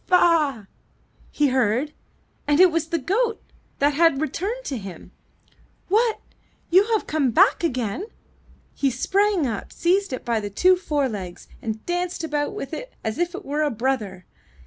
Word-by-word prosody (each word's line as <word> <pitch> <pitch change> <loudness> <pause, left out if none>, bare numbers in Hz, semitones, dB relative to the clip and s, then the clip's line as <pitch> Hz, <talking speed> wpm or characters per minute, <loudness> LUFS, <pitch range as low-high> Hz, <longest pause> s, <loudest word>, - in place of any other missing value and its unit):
''Ba 365 - +4
a - - +9
a 320 -7 +3
a!'' - - -23 0.6
he 295 -1 +1
heard, 255 +3 +1 0.5
and 290 +1 +3
it 370 -1 +7
was 325 -1 -1
the 335 - -1
goat 440 - 0 0.4
that 285 +1 +2
had 330 -2 +3
returned 405 +11 -3
to 265 -4 -3
him. 195 -3 -10 0.8
'What! 445 +3 +3
have - - -29 0.5
you 380 +4 +6 0.2
come 300 -4 +1
back 230 - +4
again?'' 255 - -2 0.7
He 275 - +1
sprang 385 - +1
up, 225 -5 -4
seized 380 +2 +1
it 255 - -5
by 235 -2 +1
the 205 -1 -5
two 365 - +4
forelegs, 260 - -3
and 220 -1 -5
danced 355 -1 -2
about 295 -2 -2
with 275 - -6
it - - -7
as 220 +5 -3
if 350 0 -1
it 385 - -8
were 295 +2 -1
a 300 - +2
brother. 220 -7 -2
295 Hz, 170 wpm, -23 LUFS, 250-360 Hz, 0.8 s, a